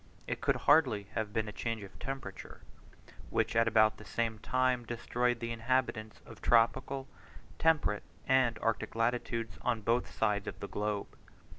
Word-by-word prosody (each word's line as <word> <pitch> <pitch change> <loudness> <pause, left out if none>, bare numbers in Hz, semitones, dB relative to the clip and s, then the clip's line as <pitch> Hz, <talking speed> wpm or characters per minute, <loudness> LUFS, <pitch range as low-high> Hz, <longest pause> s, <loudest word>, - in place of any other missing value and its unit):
It - - -4
could - - +2
hardly 140 -9 +4
have 110 -2 -2
been 110 0 -1
a - - -4
change 115 -1 -3
of 95 - -12
temperature, 135 +2 -6 0.7
which - - 0
at 115 0 +4
about 110 -1 +4
the - - -11
same 110 0 -2
time 130 +1 +1
destroyed 120 +1 -1
the 115 0 -3
inhabitants 115 -2 -1
of - - -13
tropical, 130 +4 +2 0.5
temperate, 155 -10 +3 0.3
and 130 -3 +3
arctic 115 -1 -1
latitudes 115 -2 -1
on 120 -3 0
both 115 +3 +1
sides 105 -2 0
of - - -5
the 100 - -5
globe. 105 -1 -3
115 Hz, 155 wpm, -32 LUFS, 110-125 Hz, 0.7 s, hardly